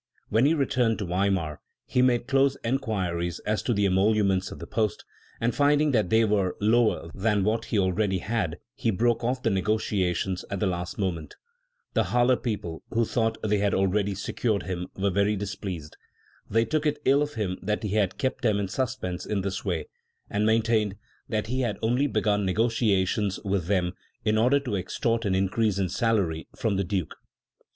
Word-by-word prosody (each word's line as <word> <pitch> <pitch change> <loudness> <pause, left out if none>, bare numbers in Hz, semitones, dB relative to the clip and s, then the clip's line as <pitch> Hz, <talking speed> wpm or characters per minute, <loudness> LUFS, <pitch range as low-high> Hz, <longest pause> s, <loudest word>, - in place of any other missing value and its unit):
When 115 +6 +4
he 160 - +3
returned 125 -5 +1
to 105 - -3
Weimar, 90 -4 0 0.2
he 125 - +1
made 125 -2 +3
closer 135 0 +3
enquiries 95 - -1
as 105 0 -1
to - - -1
the 100 -3 +2
emoluments 95 0 +2
of - - -8
the - - -7
post, 110 -2 -1 0.3
and 120 +1 +1
finding 145 +1 +3
that 110 -8 +2
they 110 0 +4
were 100 -4 +1
lower 110 -6 +2
than 105 0 +1
what 110 +3 0
he 110 - -1
already 95 +1 +1
had 95 -4 -2 0.2
he 125 -3 -1
broke 120 +3 +1
off 125 +2 -1
the 115 - +2
negociations 95 -2 0
at 100 - -3
the 105 - +1
last 90 -1 -3
moment. 90 -6 -3 0.6
The - - +2
Halle 125 +1 +3
people, 105 -9 -4
who 115 0 +1
thought 115 0 0
they 105 -1 +1
had 100 0 +1
al 95 - +3
ready 100 +1 0
secured 100 +1 -1
him, 90 -1 -4
were 100 0 +1
very 100 +3 +2
displeased. 95 -6 -5 0.5
They 115 +2 +2
took 155 +5 0
it 150 0 0
ill 140 +2 +5
of 150 0 -2
him 95 -5 -2
that 105 +3 -2
he 105 - -1
had 105 -4 +1
kept 130 0 -1
them 110 -5 +2
in 100 -2 -2
suspense 120 -8 -3
in 105 -2 0
this 100 +1 -3
way, 85 -5 -2 0.5
and 105 +1 +1
maintained 110 -2 +2 0.3
that 110 -3 -1
he 130 +4 -1
had 110 -5 -1
only 125 +6 +2
begun 105 -4 +1
negociations 105 -1 +1
with 95 -4 0
them 90 -3 +1 0.3
in 110 0 +3
order 125 +5 +4
to 125 -7 -3
extort 115 +5 -1
an 95 -2 +1
increase 100 +2 +1
in 95 -2 0
salary 95 -7 0
from 105 -4 0
the 100 - +1
Duke. 90 -2 -2
105 Hz, 190 wpm, -26 LUFS, 95-115 Hz, 0.6 s, ill